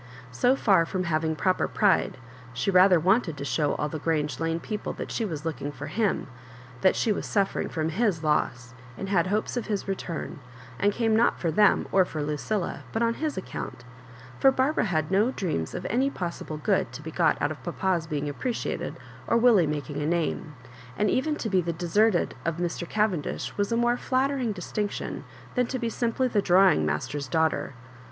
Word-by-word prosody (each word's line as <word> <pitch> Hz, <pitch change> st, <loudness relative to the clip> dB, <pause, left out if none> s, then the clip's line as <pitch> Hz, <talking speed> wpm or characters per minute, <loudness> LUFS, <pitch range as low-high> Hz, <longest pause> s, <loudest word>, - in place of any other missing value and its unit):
So 245 Hz, -, +3 dB
far 195 Hz, -10 st, +4 dB
from 185 Hz, +2 st, -2 dB
having 160 Hz, -1 st, 0 dB
proper 185 Hz, +3 st, +1 dB
pride, 205 Hz, -2 st, +2 dB, 0.4 s
she.rather 180 Hz, +7 st, +5 dB
wanted 185 Hz, -2 st, +2 dB
to 140 Hz, -, -5 dB
show 145 Hz, +1 st, 0 dB
all 150 Hz, -, -1 dB
the 155 Hz, +1 st, -5 dB
Grange 150 Hz, -4 st, -1 dB
Lane 165 Hz, 0 st, -1 dB
people 210 Hz, +4 st, -4 dB
that -, -, -6 dB
she 230 Hz, -, -1 dB
was 160 Hz, -5 st, -5 dB
looking 150 Hz, -3 st, -3 dB
for 145 Hz, +1 st, -7 dB
At7J9, 210 Hz, +4 st, 0 dB, 0.6 s
that 190 Hz, -, +4 dB
she 225 Hz, -, +1 dB
was 205 Hz, -, -2 dB
suffering 200 Hz, -2 st, 0 dB
from 160 Hz, -1 st, -1 dB
hie 220 Hz, +7 st, +2 dB
loss, 125 Hz, -5 st, 0 dB, 0.2 s
and 195 Hz, -, -5 dB
liad 185 Hz, -3 st, +2 dB
hopes 210 Hz, +5 st, -1 dB
of 240 Hz, -, -3 dB
his 205 Hz, -2 st, -2 dB
return, 180 Hz, -6 st, -4 dB, 0.4 s
and 205 Hz, -, +3 dB
came 225 Hz, 0 st, +1 dB
not 230 Hz, +2 st, +3 dB
for 165 Hz, -, 0 dB
them, 205 Hz, +5 st, +4 dB
or 190 Hz, -, +5 dB
for 155 Hz, -4 st, -4 dB
Lucilla, 150 Hz, +6 st, -2 dB
but 225 Hz, -, 0 dB
on 230 Hz, 0 st, +2 dB
his 305 Hz, 0 st, -3 dB
account; 155 Hz, -8 st, -6 dB, 0.6 s
for 270 Hz, -, +6 dB
Barbara 265 Hz, +2 st, +1 dB
had 155 Hz, -5 st, -1 dB
no 205 Hz, +5 st, +3 dB
dreams 165 Hz, -, -3 dB
of -, -, -5 dB
any 260 Hz, +5 st, +1 dB
possible 170 Hz, -, -5 dB
good 170 Hz, -, 0 dB
to 140 Hz, +4 st, -8 dB
be 160 Hz, -, -6 dB
got 165 Hz, -1 st, +2 dB
out 145 Hz, -, 0 dB
of 155 Hz, -, -7 dB
papa^s 175 Hz, -2 st, -1 dB
being 145 Hz, -2 st, -2 dB
appreciated, 230 Hz, -, -3 dB, 0.3 s
or 230 Hz, -, +3 dB
Willie 230 Hz, -8 st, +5 dB
mak 145 Hz, -3 st, -3 dB
ing 145 Hz, 0 st, -3 dB
a 145 Hz, -, -1 dB
name; 160 Hz, -2 st, -1 dB, 0.4 s
and 210 Hz, -1 st, +2 dB
even 300 Hz, +4 st, +1 dB
to 240 Hz, -, -4 dB
be 190 Hz, -3 st, +2 dB
the 170 Hz, 0 st, -2 dB
deserted 180 Hz, +4 st, +2 dB
of 165 Hz, -1 st, -1 dB
Mr. 175 Hz, 0 st, -3 dB
Cavendish 210 Hz, -8 st, -1 dB
was 205 Hz, +2 st, -1 dB
a 230 Hz, -, +2 dB
more 240 Hz, +1 st, +2 dB
flattering 260 Hz, -2 st, 0 dB
distinction 205 Hz, +2 st, -4 dB, 0.3 s
than 250 Hz, -2 st, +1 dB
to 260 Hz, -, -3 dB
be 235 Hz, -2 st, -2 dB
simply 240 Hz, +2 st, 0 dB
the 215 Hz, -4 st, +1 dB
drawing 180 Hz, -, +4 dB
master's 140 Hz, -, -2 dB
daughter. 160 Hz, -2 st, 0 dB
185 Hz, 195 wpm, -26 LUFS, 155-220 Hz, 0.6 s, for